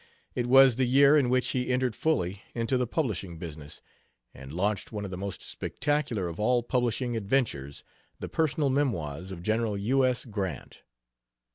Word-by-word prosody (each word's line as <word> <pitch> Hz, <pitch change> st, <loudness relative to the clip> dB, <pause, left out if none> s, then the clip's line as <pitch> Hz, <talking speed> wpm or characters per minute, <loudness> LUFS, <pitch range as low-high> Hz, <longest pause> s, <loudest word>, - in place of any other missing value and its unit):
It 125 Hz, -2 st, -1 dB
was 130 Hz, -1 st, +7 dB
the 130 Hz, -, +2 dB
year 140 Hz, +3 st, +6 dB
in 140 Hz, -5 st, +3 dB
which 125 Hz, 0 st, +2 dB
he 125 Hz, -1 st, -1 dB
entered 125 Hz, -2 st, 0 dB
fully 100 Hz, -, 0 dB
into 115 Hz, +2 st, 0 dB
the 125 Hz, -1 st, +1 dB
publishing 100 Hz, -, -2 dB
business 75 Hz, -3 st, -9 dB, 0.5 s
and 65 Hz, 0 st, -11 dB
launched 100 Hz, +5 st, -1 dB
one 105 Hz, -2 st, -4 dB
of 95 Hz, -, -7 dB
the -, -, -4 dB
most 100 Hz, 0 st, -5 dB
spectacular 145 Hz, -10 st, -2 dB
of 85 Hz, +2 st, -7 dB
all 120 Hz, +3 st, +2 dB
publishing 120 Hz, 0 st, -1 dB
adventures, 100 Hz, -, -1 dB, 0.4 s
The -, -, -5 dB
Personal 150 Hz, -3 st, 0 dB
Memoirs 95 Hz, -, -1 dB
of 85 Hz, -2 st, -8 dB
General 110 Hz, 0 st, 0 dB
U. 130 Hz, +7 st, +2 dB
S. 125 Hz, 0 st, +1 dB
Grant. 100 Hz, -, -5 dB
115 Hz, 165 wpm, -28 LUFS, 95-130 Hz, 0.5 s, was